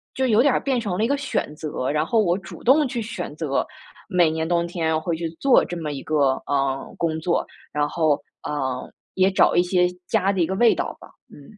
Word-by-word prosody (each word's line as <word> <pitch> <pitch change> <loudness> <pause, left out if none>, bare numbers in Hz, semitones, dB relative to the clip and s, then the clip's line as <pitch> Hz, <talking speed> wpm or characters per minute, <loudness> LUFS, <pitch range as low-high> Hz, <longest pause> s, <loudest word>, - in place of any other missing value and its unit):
就 265 - +1
有 225 -2 +4
点 280 +2 +4
儿 - - +2
变 265 -3 0
成 200 -6 -3
了 215 - +1
一 - - +2
个 280 - +2
选 270 - -2
择， 150 -4 -3
然 150 +1 +1
后 225 - +2
我 175 -2 +2
主 190 - -11
动 280 +4 +5
去 245 -2 -3
选 210 -8 -6
择， 150 -4 -1 0.4
每 180 -5 +3
年 160 0 -2
冬 170 0 +1
天 160 -2 -1
会 170 +1 -1
去 165 0 -3
做 275 -2 +5
这 175 - -6
么 155 -3 -4
一 140 -2 -5
个， 140 -4 +2
呃， 135 -1 -1
工 160 -1 -1
作， 170 +2 0 0.3
然 145 0 +1
后， 155 -4 +1 0.2
呃， 130 -4 -3 0.3
也 190 0 +4
找 190 - +3
一 175 - +6
些 180 0 +2 0.2
家 195 - +2
的 195 - -2
一 165 - +2
个 190 - -2
味 235 +3 +5
道 - - -4
吧， - - -13 0.2
嗯。 150 +9 -15
170 Hz, 250 characters per minute, -23 LUFS, 150-210 Hz, 0.4 s, 一